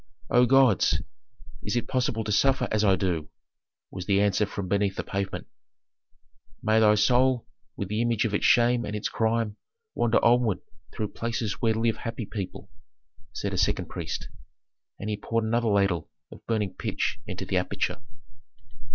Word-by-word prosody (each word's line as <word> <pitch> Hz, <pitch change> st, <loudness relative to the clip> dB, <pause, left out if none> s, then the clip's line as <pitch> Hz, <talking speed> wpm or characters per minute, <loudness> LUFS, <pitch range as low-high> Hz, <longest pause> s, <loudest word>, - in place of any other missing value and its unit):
"O 125 Hz, 0 st, +5 dB
gods! 130 Hz, -5 st, +4 dB, 0.6 s
is 105 Hz, -, -3 dB
it 120 Hz, -, -1 dB
possible 120 Hz, -3 st, 0 dB
to 105 Hz, -, -3 dB
suffer 130 Hz, +3 st, +3 dB
as 110 Hz, 0 st, +2 dB
I 100 Hz, -2 st, +5 dB
do?" 90 Hz, -5 st, -2 dB, 0.6 s
was 90 Hz, -1 st, -7 dB
the 100 Hz, -1 st, +3 dB
answer 105 Hz, +1 st, +2 dB
from 100 Hz, -2 st, -5 dB
beneath 100 Hz, +1 st, +1 dB
the -, -, -3 dB
pavement. 100 Hz, 0 st, -3 dB, 1.2 s
"May 110 Hz, +1 st, +3 dB
thy 105 Hz, -1 st, +5 dB
soul, 125 Hz, +3 st, +3 dB, 0.3 s
with 100 Hz, -, -4 dB
the 105 Hz, +2 st, 0 dB
image 115 Hz, -1 st, +1 dB
of 110 Hz, -, -1 dB
its 105 Hz, -, 0 dB
shame 120 Hz, 0 st, +4 dB
and 105 Hz, -3 st, -4 dB
its 105 Hz, -, -2 dB
crime, 110 Hz, -1 st, 0 dB, 0.4 s
wander 115 Hz, -1 st, +2 dB
onward 120 Hz, -5 st, +3 dB, 0.3 s
through 105 Hz, -2 st, -3 dB
places 115 Hz, -2 st, -3 dB
where 110 Hz, -2 st, +2 dB
live 115 Hz, 0 st, +1 dB
happy 115 Hz, -1 st, -5 dB
people," 100 Hz, -1 st, -6 dB, 0.6 s
said 100 Hz, -2 st, -4 dB
a 95 Hz, -, 0 dB
second 90 Hz, -, 0 dB
priest; -, -, -5 dB, 0.7 s
and -, -, -6 dB
he 105 Hz, -1 st, -1 dB
poured 115 Hz, +2 st, -1 dB
another 115 Hz, +1 st, +1 dB
ladle 100 Hz, -6 st, +1 dB, 0.2 s
of -, -, -13 dB
burning 105 Hz, -4 st, 0 dB
pitch 115 Hz, -, -2 dB
into 95 Hz, -1 st, -5 dB
the 95 Hz, -, 0 dB
aperture. 90 Hz, +3 st, -2 dB
110 Hz, 165 wpm, -27 LUFS, 100-115 Hz, 1.2 s, O